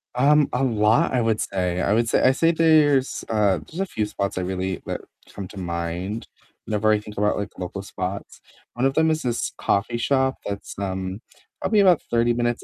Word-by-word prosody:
Um, 145 Hz, +3 st, +4 dB
a 125 Hz, -, 0 dB
lot 115 Hz, +5 st, +2 dB
I 125 Hz, -, +2 dB
would 115 Hz, -1 st, +1 dB
say 90 Hz, -2 st, -1 dB
I 100 Hz, -, +2 dB
would 115 Hz, +1 st, +2 dB
say -, -, +2 dB
I 130 Hz, -, +5 dB
say 165 Hz, +5 st, +3 dB
there's, 155 Hz, -5 st, +3 dB
uh, 105 Hz, -5 st, +2 dB
there's 165 Hz, -, -9 dB
a 195 Hz, -, +1 dB
few 110 Hz, -, -2 dB
spots 100 Hz, -1 st, -3 dB
I -, -, 0 dB
really 95 Hz, 0 st, -3 dB
that -, -, -4 dB, 0.3 s
come 100 Hz, -2 st, -6 dB
to 105 Hz, -, -12 dB
mind 85 Hz, +4 st, -4 dB, 0.4 s
whenever 110 Hz, 0 st, +1 dB
I 105 Hz, -, +3 dB
think 105 Hz, 0 st, -11 dB
about, 105 Hz, +1 st, +1 dB
like, 100 Hz, 0 st, -3 dB
local 95 Hz, +2 st, -5 dB
spots. 95 Hz, 0 st, -6 dB, 0.3 s
One 120 Hz, +2 st, -1 dB
of 135 Hz, -, +2 dB
them 160 Hz, +2 st, +3 dB
is 155 Hz, 0 st, 0 dB
this 120 Hz, -1 st, -1 dB
coffee 110 Hz, +4 st, 0 dB
shop 130 Hz, +2 st, +1 dB
that's, 100 Hz, -1 st, -6 dB
um, 95 Hz, 0 st, -4 dB, 0.4 s
probably 215 Hz, -, +2 dB
about 185 Hz, -5 st, +5 dB
30 120 Hz, 0 st, +3 dB
minutes 120 Hz, 0 st, -1 dB
110 Hz, 205 wpm, -23 LUFS, 100-130 Hz, 0.4 s, I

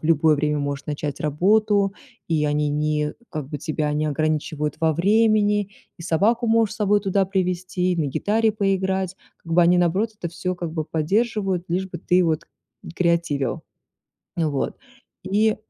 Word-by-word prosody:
любое 155 Hz, -1 st, +3 dB
время 150 Hz, +1 st, 0 dB
можешь 140 Hz, -1 st, -3 dB
начать 145 Hz, -1 st, -4 dB
работу, 200 Hz, +6 st, +2 dB, 0.4 s
и 155 Hz, -2 st, +1 dB
они 150 Hz, 0 st, +1 dB
не 150 Hz, 0 st, 0 dB, 0.2 s
как 155 Hz, -5 st, -5 dB
бы 150 Hz, -, -4 dB
тебя 150 Hz, 0 st, -2 dB
не 150 Hz, +1 st, 0 dB
ограничивают 150 Hz, 0 st, -1 dB
во 160 Hz, -1 st, +2 dB
времени, 210 Hz, +2 st, +3 dB, 0.3 s
и -, -, -9 dB
собаку 215 Hz, +9 st, +1 dB
можешь 225 Hz, -1 st, +3 dB
с -, -, -11 dB
собой 205 Hz, 0 st, +3 dB
туда 195 Hz, -1 st, +1 dB
привести, 185 Hz, -1 st, -1 dB
и -, -, -2 dB
на 155 Hz, -3 st, 0 dB
гитаре 215 Hz, +10 st, +1 dB
поиграть. 190 Hz, -2 st, 0 dB, 0.3 s
Как 165 Hz, -, -6 dB
бы 175 Hz, -, +5 dB
они, 175 Hz, +1 st, +5 dB
наоборот, 185 Hz, +6 st, +1 dB
это 170 Hz, -5 st, -4 dB
всё, 180 Hz, +2 st, -3 dB
как 170 Hz, -2 st, -5 dB
бы, 160 Hz, -2 st, -2 dB
поддерживают, 195 Hz, +2 st, 0 dB
лишь 185 Hz, +2 st, -1 dB
бы 175 Hz, -, -6 dB
ты 180 Hz, +1 st, +2 dB
вот 160 Hz, -2 st, 0 dB, 0.5 s
креативил. 170 Hz, -6 st, 0 dB, 0.7 s
Вот. 155 Hz, -5 st, -1 dB, 0.5 s
И 215 Hz, +2 st, +2 dB
175 Hz, 160 wpm, -23 LUFS, 155-200 Hz, 0.7 s, бы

